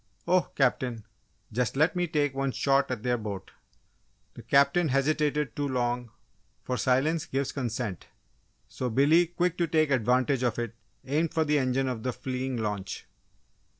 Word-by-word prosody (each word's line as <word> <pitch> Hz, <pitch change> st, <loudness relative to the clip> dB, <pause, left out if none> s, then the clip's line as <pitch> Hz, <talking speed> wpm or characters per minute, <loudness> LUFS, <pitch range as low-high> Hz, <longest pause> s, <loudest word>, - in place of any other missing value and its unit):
"Oh, 180 Hz, -3 st, +3 dB
Captain, 125 Hz, -4 st, 0 dB, 0.5 s
just 125 Hz, +3 st, -1 dB
let 155 Hz, +5 st, +3 dB
me 180 Hz, 0 st, 0 dB
take 145 Hz, -4 st, 0 dB
one 135 Hz, 0 st, -1 dB
shot 135 Hz, 0 st, +2 dB
at 125 Hz, -4 st, -4 dB
their 125 Hz, -1 st, +1 dB
boat!" 100 Hz, -3 st, -6 dB, 0.8 s
The -, -, -10 dB
Captain 140 Hz, +5 st, +3 dB
hesitated 150 Hz, 0 st, +1 dB
too 145 Hz, 0 st, -1 dB
long, 125 Hz, -2 st, -1 dB, 0.5 s
for 125 Hz, -, -2 dB
silence 135 Hz, +6 st, +1 dB
gives 135 Hz, 0 st, -1 dB
consent. 120 Hz, -, -4 dB, 0.6 s
So 125 Hz, -, -3 dB
Billy, 150 Hz, +8 st, +4 dB
quick 175 Hz, +1 st, -1 dB
to 170 Hz, -, +2 dB
take 155 Hz, -2 st, +2 dB
advantage 125 Hz, +1 st, +2 dB
of 125 Hz, -2 st, 0 dB
it, 120 Hz, -2 st, -3 dB, 0.3 s
aimed 155 Hz, +5 st, 0 dB
for 160 Hz, -1 st, +2 dB
the 150 Hz, 0 st, +2 dB
engine 130 Hz, 0 st, +1 dB
of 125 Hz, -3 st, -3 dB
the 125 Hz, +2 st, -2 dB
fleeing 130 Hz, 0 st, -3 dB
launch. 105 Hz, -3 st, -4 dB
135 Hz, 155 wpm, -28 LUFS, 125-150 Hz, 0.8 s, Billy